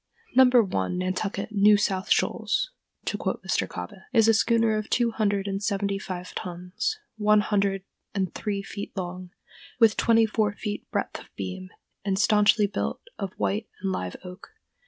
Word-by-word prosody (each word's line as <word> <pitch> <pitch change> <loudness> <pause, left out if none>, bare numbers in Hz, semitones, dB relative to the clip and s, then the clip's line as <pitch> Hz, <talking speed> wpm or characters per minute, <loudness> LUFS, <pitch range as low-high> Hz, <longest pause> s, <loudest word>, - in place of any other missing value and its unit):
"No. 260 0 +8
1, 200 - +2
Nantucket 190 +3 -2
New 205 0 +6
South 195 -2 -1
Shoals," - - +1 0.3
to - - -2
quote - - -2
Mr. - - 0
Kobbé, 200 -3 -7
is 225 -3 +5
a 225 - +6
schooner 225 0 +3
of 215 0 -3
two 240 -2 +2
hundred 205 -3 0
and 195 0 -2
seventy 200 -1 -1
five 180 -2 -6
tons, 180 - -3 0.2
one 210 0 +4
hundred 200 -2 0 0.3
and 190 -3 -1
three 200 -2 -3
feet 200 0 -7
long, 180 0 -5 0.5
with 225 -3 +5
twenty 225 -1 +4
four 210 -1 0
feet 205 0 -5
breadth - - -2
of - - -14
beam, 100 - -5 0.3
and 195 -1 0
stanchly 210 +1 +4
built 200 - -3 0.2
of 195 -3 -4
white 210 +2 -1
and 195 - 0
live 90 - -3
oak. 180 - -11
200 Hz, 165 wpm, -26 LUFS, 190-215 Hz, 0.5 s, No